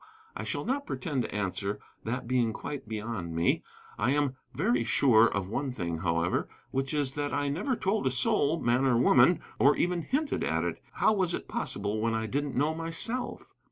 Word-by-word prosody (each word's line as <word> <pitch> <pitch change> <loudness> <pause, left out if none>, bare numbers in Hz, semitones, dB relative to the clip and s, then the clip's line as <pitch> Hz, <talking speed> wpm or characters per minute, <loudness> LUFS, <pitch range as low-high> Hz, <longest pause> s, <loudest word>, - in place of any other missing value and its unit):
I - - -4
shall - - -2
not 280 +3 -1
pretend 145 -8 -2
to 115 - -5
answer, 100 0 -2 0.3
that 115 +2 -3
being 120 -3 +1
quite 140 0 -6
beyond 105 -6 -4
me. 85 +1 +2 0.4
I - - +2
am 140 -1 +1 0.2
very 120 -1 +1
sure 115 -2 +5
of 100 -4 -2
one 135 +6 -2
thing, 85 -8 -3
however, 85 0 0 0.2
which 135 0 -1
is 145 -3 0
that 145 +1 -2
I 145 0 0
never 200 - -1
told 200 - 0
a - - +4
soul, 140 +5 +2
man 120 0 +2
or 130 -3 +4
woman, 125 +7 +5 0.2
or 140 +2 +6
even 175 -1 +1
hinted 280 - -1
at - - 0
it. - - -3
How - - +3
was 185 -4 +1
it - - -7
possible 105 +2 -2
when 115 0 +1
I 110 0 -1
didn't 140 +5 -2
know 150 +4 +2
myself? 165 +10 -3
130 Hz, 190 wpm, -29 LUFS, 110-155 Hz, 0.4 s, or